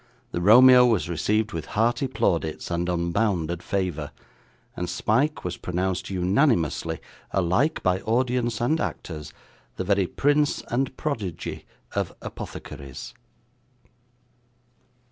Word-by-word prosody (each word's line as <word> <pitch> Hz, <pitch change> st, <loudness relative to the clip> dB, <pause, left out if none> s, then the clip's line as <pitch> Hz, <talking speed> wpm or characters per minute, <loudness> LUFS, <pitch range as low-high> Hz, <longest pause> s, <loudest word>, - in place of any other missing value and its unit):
The 85 Hz, -, -2 dB
Romeo 125 Hz, +6 st, +8 dB
was 110 Hz, -8 st, +1 dB
received 105 Hz, +6 st, 0 dB
with 80 Hz, -2 st, -5 dB
hearty 120 Hz, +5 st, +2 dB
plaudits 85 Hz, -10 st, -1 dB
and 85 Hz, +1 st, -1 dB
unbounded 85 Hz, -1 st, 0 dB
favour, 90 Hz, -7 st, -2 dB, 0.7 s
and 90 Hz, -1 st, -3 dB
Smike 120 Hz, -, +1 dB
was 90 Hz, -1 st, -4 dB
pronounced 90 Hz, +1 st, -2 dB
unanimously, 95 Hz, -, +1 dB, 0.3 s
alike 95 Hz, -, +1 dB
by 90 Hz, 0 st, +2 dB
audience 120 Hz, 0 st, 0 dB
and 155 Hz, +7 st, +1 dB
actors, 75 Hz, -2 st, -5 dB, 0.4 s
the -, -, -3 dB
very 100 Hz, -1 st, +2 dB
prince 145 Hz, +5 st, +1 dB
and 130 Hz, +2 st, -1 dB
prodigy 110 Hz, -, -4 dB, 0.3 s
of -, -, -2 dB
Apothecaries. 70 Hz, -2 st, -8 dB
95 Hz, 105 wpm, -25 LUFS, 85-125 Hz, 0.7 s, Romeo